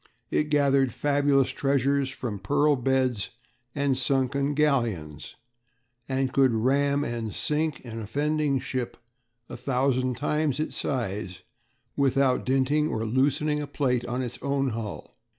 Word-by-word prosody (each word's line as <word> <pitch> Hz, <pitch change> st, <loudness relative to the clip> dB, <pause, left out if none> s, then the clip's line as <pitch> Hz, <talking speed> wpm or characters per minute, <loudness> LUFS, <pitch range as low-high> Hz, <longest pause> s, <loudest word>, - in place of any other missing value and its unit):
It 150 Hz, -, +1 dB
gathered 140 Hz, -3 st, +2 dB
fabulous 140 Hz, -2 st, +2 dB
treasures 140 Hz, 0 st, +1 dB
from 125 Hz, -6 st, -5 dB
pearl 145 Hz, +8 st, +2 dB
beds 130 Hz, -4 st, 0 dB, 0.5 s
and 140 Hz, -2 st, +1 dB
sunken 135 Hz, +2 st, +1 dB
galleons; 115 Hz, -, -1 dB, 0.7 s
and 130 Hz, -1 st, 0 dB
could 130 Hz, -4 st, +4 dB
ram 140 Hz, +5 st, +2 dB
and 115 Hz, -5 st, -4 dB
sink 150 Hz, -2 st, -1 dB
an 115 Hz, -1 st, -6 dB
offending 145 Hz, +5 st, 0 dB
ship 125 Hz, -1 st, -4 dB, 0.5 s
a -, -, -8 dB
thousand 130 Hz, -2 st, 0 dB
times 150 Hz, 0 st, 0 dB
its 155 Hz, -, -3 dB
size 100 Hz, -8 st, -3 dB, 0.5 s
without 135 Hz, -2 st, +2 dB
dinting 135 Hz, +3 st, +2 dB
or 110 Hz, -6 st, -2 dB
loosening 145 Hz, +5 st, +1 dB
a 145 Hz, -, -5 dB
plate 125 Hz, -5 st, 0 dB
on 125 Hz, +2 st, -2 dB
its 120 Hz, -1 st, -6 dB
own 140 Hz, -1 st, 0 dB
hull. 110 Hz, -3 st, -6 dB
135 Hz, 130 wpm, -26 LUFS, 125-145 Hz, 0.7 s, could